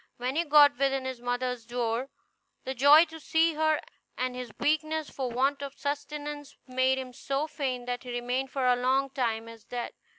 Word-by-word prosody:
When 250 +2 -2
he 335 - +2
got 290 -2 +6
within 270 -1 +1
his 260 -2 -5
mother's 245 0 -2
door, 240 +2 -2 0.5
the 265 - -3
joy 285 +6 +7
to 320 0 -11
see 320 +1 +2
her 315 0 +2 0.4
and 255 0 -2
his 250 -2 -6
weakness 310 0 0
for 260 -2 -3
want 270 +4 +1
of 280 0 -6
sustenance 290 0 -5
made 260 0 +2
him 255 -1 -6
so 275 +4 -2
faint 260 -5 -3
that 245 0 -3
he 250 - -10
remained 245 +2 -2
for 270 -1 -1
a 250 0 +5
long 260 +2 +1
time 230 -4 -1
as 230 -2 -12
dead. 245 -1 -5
265 Hz, 190 wpm, -28 LUFS, 245-290 Hz, 0.5 s, joy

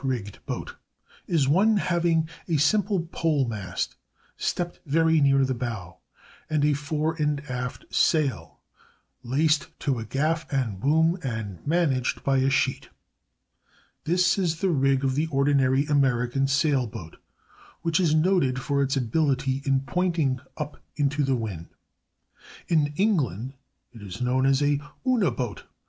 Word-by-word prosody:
_, - - -19
cat 135 - 0
rigged 105 -6 -5
boat) - - -5 0.5
is 155 -6 +2
one 205 +9 +4
having 170 -3 +1 0.2
a 165 -3 +1
simple 195 +3 +2
pole 150 -6 +1
mast 100 -5 -4 0.4
stepped 175 0 -3
very 160 +1 +3
near 135 -1 +4
the 130 - -1
bow, 115 -9 -5 0.5
and 150 -2 +1
a 150 - +3
fore 150 +2 -1
and 150 -1 +1
aft 125 0 -5
sail 145 -8 +1 0.6
laced 150 +5 +1
to 135 -5 -1
a - - -4
gaff 155 +8 -1
and 120 -9 -1
boom 160 - +2
and 110 - -4
managed 145 -6 +1
by 135 -1 +2
a 130 +1 +3
sheet. 135 -1 0 1.2
This 180 +3 +2
is 165 -4 0
the 190 0 +1
rig 135 -2 +2
of 135 -1 +1
the 150 +4 0
ordinary 140 -1 +2
American 135 -2 +1
sail 140 -2 +2
boat, 100 -8 -9 0.7
which 165 0 +1
is 165 -4 +3
noted 155 -6 +2
for 140 +1 0
its 140 0 0
ability 135 +1 0
in 135 -1 +2
pointing 160 -3 0 0.2
up 150 -1 -6
into 145 0 +1
the 135 -1 +1
wind. 100 -8 -5 1.0
In 150 -3 +2
England 135 - 0 0.4
it 115 - -12
is 100 +1 -8
known 130 +2 +1
as 135 +1 +3
a 145 0 +1 0.2
una 240 - +3
boat. 120 -4 -5
140 Hz, 150 wpm, -25 LUFS, 130-160 Hz, 1.2 s, one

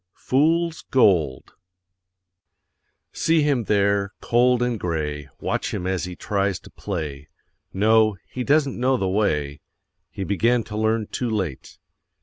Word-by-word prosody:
FOOL'S 165 +4 +1
GOLD 85 - +2 1.6
See 160 -2 +2
him 140 -6 +1
there, 100 -1 +1
cold 120 +1 +3
and 120 -3 -1
gray, 75 -5 -3
Watch - - -2
him 90 - -4
as 95 -1 -1
he 90 0 -7
tries 100 -1 -1
to - - -15
play; 75 -7 -5 0.4
No, 110 +1 +3
he 125 - -5
doesn't 140 -2 +2
know 130 +1 +2
the 95 - -1
way 75 -8 0 0.5
He 100 - -5
began 115 +5 +1
to 105 - -8
learn 110 0 +1
too 120 +3 -3
late. 95 -11 -4
105 Hz, 130 wpm, -23 LUFS, 90-125 Hz, 1.6 s, cold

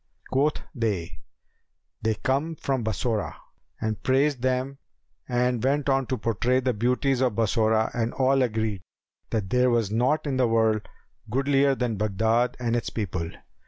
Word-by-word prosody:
Quoth 145 +3 +1
they, 105 - -2 0.8
'They 110 0 +1
come 145 +5 0
from 135 -4 -2
Bassorah,' 110 +1 -1 0.4
and 110 -1 -2
praised 135 0 +2
them 130 +2 -1 0.5
and 125 -1 +1
went 140 +2 +1
on 135 -2 +2
to 130 - -1
portray 115 +3 +1
the 130 -1 0
beauties 125 +4 +1
of 125 -5 +1
Bassorah 110 0 +2
and 115 0 -1
all 135 0 +3
agreed 110 -5 -1 0.5
that 105 -3 -2
there 125 0 +4
was 115 -4 +1
naught 125 +9 +1
in 135 -3 -1
the 125 -2 +3
world 110 -2 +2 0.4
goodlier 135 +2 +2
than 120 -4 -1
Baghdad 110 +4 +1
and 120 -1 0
its 120 - -1
people. 90 -6 -3
120 Hz, 150 wpm, -26 LUFS, 110-130 Hz, 0.8 s, there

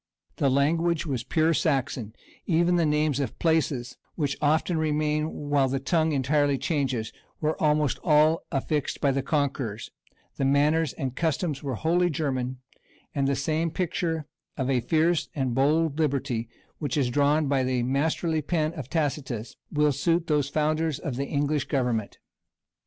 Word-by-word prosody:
The 140 - +2
language 160 +5 +1
was 130 -6 -2
pure 160 +2 +2
Saxon; 130 -8 -1 0.3
even 175 +1 +3
the 170 -2 +3
names 150 -2 +1
of 135 -6 -3
places, 155 -7 0 0.2
which 145 -4 -1
often 160 +3 +2
remain 155 0 0 0.2
while 140 -2 +4
the 135 +1 -1
tongue 160 +3 +1
entirely 140 0 +2
changes, 130 -8 -1 0.3
were 155 0 0
almost 150 -3 +2
all 155 0 +4
affixed 145 +1 -1
by 140 - +2
the 135 +1 0
conquerors; 135 -6 -2 0.5
the - - -1
manners 145 +2 +2
and 130 -2 -4
customs 160 -3 -1
were 135 -4 -3
wholly 175 +7 +2
German; 130 -5 -2 0.6
and 140 -1 0
the 140 - +1
same 155 +4 0
picture 165 -2 -2 0.3
of 135 -1 0
a 130 - +3
fierce 160 +6 +1
and 130 -4 -1
bold 150 +4 +2
liberty, 130 -6 -1 0.3
which 150 0 -2
is 130 -4 +1
drawn 145 +3 +3
by 140 -1 +1
the 130 -1 0
masterly 155 +5 0
pencil 155 +1 -1
of 135 -3 -7
Tacitus, 135 -7 -2 0.2
will 150 0 +3
suit 165 +5 +1
those 150 -4 +1
founders 155 0 0
of 140 -3 -4
the 140 +2 -2
English 145 0 0
government. 125 -7 -1
145 Hz, 155 wpm, -26 LUFS, 135-160 Hz, 0.6 s, while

